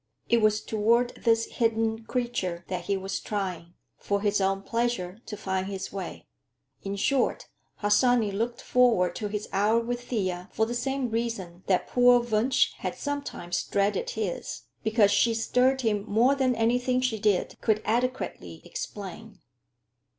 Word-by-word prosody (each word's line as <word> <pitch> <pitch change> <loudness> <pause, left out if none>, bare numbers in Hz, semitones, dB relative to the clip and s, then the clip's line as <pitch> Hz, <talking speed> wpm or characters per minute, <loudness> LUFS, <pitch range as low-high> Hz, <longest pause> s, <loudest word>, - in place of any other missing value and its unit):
It 235 -1 +4
was 215 0 +3
toward 230 +3 +2
this 230 -1 +2
hidden 225 -1 0
creature 225 -9 -2
that 180 -2 -3
he 200 +1 0
was 190 +1 -3
trying, 180 -5 -4 0.2
for 200 0 -1
his 205 -1 +1
own 195 0 +1
pleasure, 230 -5 -2
to 210 - -6
find 190 -1 -2
his 195 -1 -5
way. 190 -3 -6 0.6
In 195 0 -4
short, 260 +5 0 0.3
Harsanyi 220 +1 +3
looked 230 +4 -3
forward 225 -9 +3
to 210 - -3
his 210 0 -4
hour 210 +4 +3
with 240 +1 -3
Thea 185 -5 -2
for 220 - +2
the 235 - -4
same 255 0 -1
reason 220 -7 -3
that 185 -2 +2
poor 245 0 +5
Wunsch 240 +2 +2
had - - -3
sometimes 280 -12 -3
dreaded 200 0 0
his; 205 -5 -3 0.2
because 220 -2 +4
she 230 +1 +3
stirred 255 +3 +2
him 210 -4 0
more 230 +6 +4
than 260 -2 +1
anything 245 +3 +2
she 245 -4 0
did 205 -3 +1
could 215 -2 +2
adequately 250 +4 -2
explain. 215 - -7
220 Hz, 150 wpm, -27 LUFS, 195-240 Hz, 0.6 s, poor